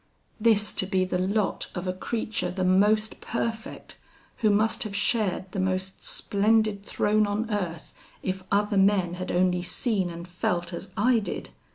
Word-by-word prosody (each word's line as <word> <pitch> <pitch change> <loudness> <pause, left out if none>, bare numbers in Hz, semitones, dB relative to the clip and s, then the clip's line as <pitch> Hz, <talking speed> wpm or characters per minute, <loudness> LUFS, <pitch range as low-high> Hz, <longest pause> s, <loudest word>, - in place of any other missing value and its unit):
This 215 -2 +3
to 190 - +1
be 190 -1 +1
the 180 0 -1
lot 200 +2 0
of 175 0 -4
a 185 - -1
creature 210 -1 -2
the 185 +1 -2
most 210 +4 +3
perfect, 225 -1 -4 0.4
who 220 - +2
must 215 +2 +2
have 210 -2 -3
shared 200 -3 0
the 195 - -3
most 185 0 -2
splendid 210 0 +1
throne 210 +1 +2
on 215 +3 -2
earth, 175 -6 -3 0.3
if 190 0 -2
other 205 0 +2
men 190 -3 +3
had 185 +1 -4
only 180 0 +2
seen 190 +1 -1
and 170 +1 -8
felt 175 0 -2
as 180 +2 -6
I 235 +3 +4
did! 210 - -5
195 Hz, 165 wpm, -26 LUFS, 185-215 Hz, 0.4 s, I